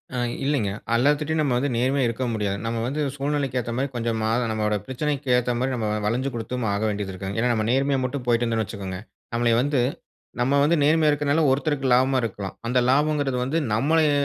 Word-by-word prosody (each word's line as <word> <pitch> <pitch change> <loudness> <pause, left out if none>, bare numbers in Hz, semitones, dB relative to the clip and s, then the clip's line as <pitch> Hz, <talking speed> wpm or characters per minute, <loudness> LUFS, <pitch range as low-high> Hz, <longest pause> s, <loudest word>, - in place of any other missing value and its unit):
ஆ - - -2 0.3
இல்லீங்க! 135 -8 +1 0.2
அல்லாத்துட்டயும் 150 +5 +2
நம்ம 140 -5 +1
வந்து 140 +3 0
நேர்மையா 130 +2 +1
இருக்கவும் 115 0 -2
முடியாது. 100 -2 -1
நம்ம 115 0 -2
வந்து 140 +5 -2
சூழ்நிலைக்கு 140 -2 -1
ஏத்தமாரி 120 +4 -2
கொஞ்சம் 115 -1 -1
மாற 110 +2 +1
நம்மவோட 105 -1 0
பிரச்சனைக்கு 140 +1 -3
ஏத்தமாரி 125 +2 0
நம்ம 110 -3 -2 0.2
வளஞ்சு 125 +5 0
குடுத்தும் 120 +1 -3
ஆக 100 - -1
வேண்டியது 100 -2 -3
இருக்குங் 95 +1 -5
ஏன்னா, 120 +2 +2
நம்ம 110 -1 0
நேர்மையா 135 +1 +2
மட்டும் 130 0 -4
போய்ட்டு 120 0 +3
இருந்தோன்னு 115 -2 0
வச்சிக்கோங்க, 95 -3 -6 0.4
நம்மளய 115 -1 +2
வந்து 140 -2 +1 0.6
நம்ம 135 +3 +2
வந்து 155 +4 +3
நேர்மையா 155 +1 +4
இருக்கனால 145 +2 +1
ஒருத்தருக்கு 140 0 0
லாபமா 130 +1 +3
இருக்கலாம். 100 -3 -4
அந்த 125 +2 +2
லாபம்ங்கிறது 145 -1 +2
வந்து 145 +6 -1 0.2
நம்மளய 150 +6 +3
125 Hz, 180 wpm, -24 LUFS, 115-140 Hz, 0.6 s, நேர்மையா